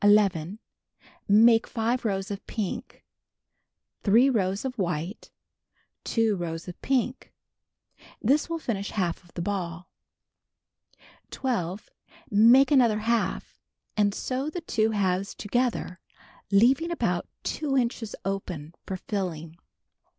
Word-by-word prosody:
Make 225 +2 +6
5 235 +1 -1
rows 195 -1 -1
of 200 - -6
pink. 230 +4 -5 1.0
3 235 +6 +5
rows 195 -1 0
of 255 -3 -4
white. 175 +2 -3 0.8
2 225 -3 +2
rows 165 -1 -5
of 180 - -9
pink. 260 -1 -1 0.9
This 285 +8 +2
will 335 - -1
finish 205 -10 -3
half 180 -3 -2
of 175 - -21
the 170 - -3
ball. 180 -3 -4 1.4
12. 205 -7 -3 0.4
Make 235 +7 +6
another 240 -6 +5
half, 230 +1 -1 0.3
and 205 -1 +3
sew 265 +3 -2
the 345 +3 -5
two 220 -8 +1
halves 195 -2 0
together, 225 -5 -1 0.5
leaving 250 - +4
about 340 - -1 0.2
2 280 -3 -1
inches 235 -3 -1
open 180 -5 -4
for 190 - -3
filling. 170 -5 -4
210 Hz, 110 wpm, -27 LUFS, 185-245 Hz, 1.4 s, Make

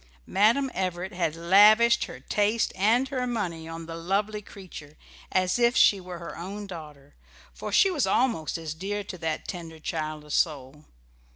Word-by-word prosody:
Madam 235 +7 +2
Everett 185 0 -3
had 170 -3 -1
lavished 210 +7 +5
her - - -10
taste 215 +2 0
and 225 +7 +2
her 255 -2 -2
money 175 -9 -3
on 165 0 -7
the 165 0 -7
lovely 200 +5 -1
creature 180 -7 -12 0.3
as 185 +4 +1
if 240 +1 +3
she 200 -2 +5
were 180 -1 -8
her 170 0 -8
own 200 +5 -6
daughter, 150 -6 -11 0.4
for - - -6
she 390 - +5
was 305 -7 0
almost 170 -14 +1
as 160 -2 -5
dear 200 +5 -4
to 185 -2 -8
that 160 -2 -3
tender, 165 -3 -7
childless 155 -1 -5
soul. 150 -1 -1
185 Hz, 165 wpm, -26 LUFS, 160-210 Hz, 0.4 s, lavished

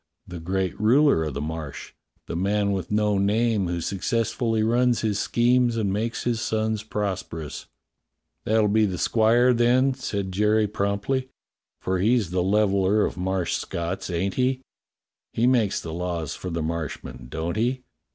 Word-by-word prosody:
"The 90 -1 -8
great 95 +2 -2
ruler 125 - +4
o' - - -2
the 70 0 -5
Marsh 80 -2 -6 0.2
— - - -45
the - - -4
man 100 +3 +1
with 95 -3 -3
no 105 -1 +1
name 105 0 +1
who 85 0 -2
successfully 115 +4 -1
runs 120 +1 +2
his 105 -3 0
schemes 120 0 +2
and 100 -4 0
makes 115 +3 -2
his 120 -2 -1
sons 110 -1 -1
prosperous." 95 -8 -4 0.8
"That'll 110 0 +2
be 110 +1 +3
the 90 -2 -3
squire, 120 +5 +3
then," 125 +3 +3
said 100 -7 -4
Jerry 105 +3 +2
promptly, 105 +6 -1 0.5
"for 95 0 -1
he's 110 -2 +2
the 90 0 +1
Leveller 100 +1 +2
of - - -4
Marsh 95 -1 -1
Scotts, 85 +3 -3
ain't 95 +2 -1
he.^^ 130 0 0 0.7
He 115 - +1
makes 120 -6 +2
the 80 - -7
laws 85 -3 -3
for 90 - -6
the 85 -2 -2
Marshmen, 75 -6 -5
don't 80 +5 -3
he. 125 +4 0
105 Hz, 160 wpm, -24 LUFS, 90-115 Hz, 0.8 s, ruler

